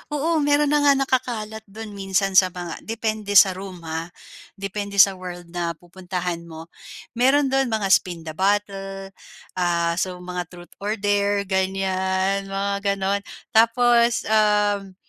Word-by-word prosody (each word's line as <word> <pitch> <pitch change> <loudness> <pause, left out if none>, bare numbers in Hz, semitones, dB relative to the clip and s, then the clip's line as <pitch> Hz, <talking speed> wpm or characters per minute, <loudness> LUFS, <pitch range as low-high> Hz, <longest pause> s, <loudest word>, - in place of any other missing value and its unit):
Oo 320 +3 +1
meron 290 0 +2
na 295 - +4
nga 285 -1 +5
nakakalat 245 -5 -2
dun 215 +2 -9
minsan 195 0 -1
sa 185 - +3
mga 175 -2 -7
depende 220 -2 -3
sa 195 0 +8
room 185 -2 -9
ha, 160 +1 -4 0.5
depende 200 +1 -5
sa 200 0 +7
world 175 -2 -8
na 170 -1 -3
pupuntahan 180 0 -5
mo. 165 0 -11 0.4
Meron 265 +3 +3
dun 270 0 +2
mga 220 -4 -1
Spin 175 -3 +2
the 160 - -6
Bottle, 195 +1 -2 0.5
ah, 170 -1 +1
so 185 -1 -2
mga 180 -1 -5
Truth 175 0 -14
or 210 +2 -2
Dare, 205 -1 +1
ganyan, 190 0 -1
mga 200 0 -1
ganun. 195 +1 0 0.3
Tapos, 235 +1 +4
um, 210 -2 +1
195 Hz, 145 wpm, -23 LUFS, 185-220 Hz, 0.5 s, sa